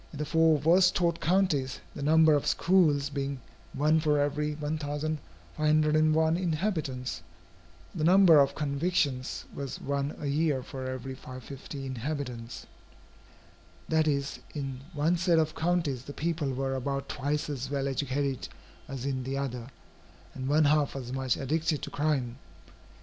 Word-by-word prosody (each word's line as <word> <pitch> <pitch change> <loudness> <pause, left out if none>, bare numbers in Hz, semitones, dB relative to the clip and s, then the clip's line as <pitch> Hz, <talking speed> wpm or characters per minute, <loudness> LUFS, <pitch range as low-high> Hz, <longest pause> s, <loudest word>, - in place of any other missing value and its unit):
In 150 - -9
the 150 - -2
four 160 +1 +4
worst 175 +5 +4
taught 170 -2 +1
counties, 155 -6 +1
the - - -7
number 160 +2 +5
of 145 - +1
schools 150 -6 +3
being 140 -1 -3 0.3
one 155 +3 +2
for 150 -2 +2
every 150 +1 0
1501 155 - 0
inhabitants, 155 - -2 0.7
the - - -3
number 175 -2 +7
of 140 -1 +3
convictions 140 -3 -1
was 140 -2 -5
one 140 +1 -2
a - - -5
year 145 -2 +1
for 130 0 -6
every 130 0 -5
550 130 +2 -8
inhabitants. 125 -2 -5 1.2
That 160 -1 +3
is, 140 -1 -1 0.2
in 135 -3 -4 0.2
one 160 +4 +2
set 175 -1 +3
of 155 -1 +2
counties, 160 -7 -1
the 145 - -7
people 155 -3 -1
were 135 +1 -2
about 140 +1 -2
twice 145 +3 -2
as 135 -3 -4
well 140 -1 -1
educated 135 0 -2 0.4
as 135 -1 -6
in 130 -2 -2
the 135 +2 -3
other, 125 -3 -4 0.6
and 130 0 -5
one 150 +2 +4
half 145 -1 +2
as 125 -2 -5
much 130 -2 0
addicted 155 +2 -1
to - - -5
crime. 140 -5 -1
145 Hz, 145 wpm, -29 LUFS, 135-155 Hz, 1.2 s, number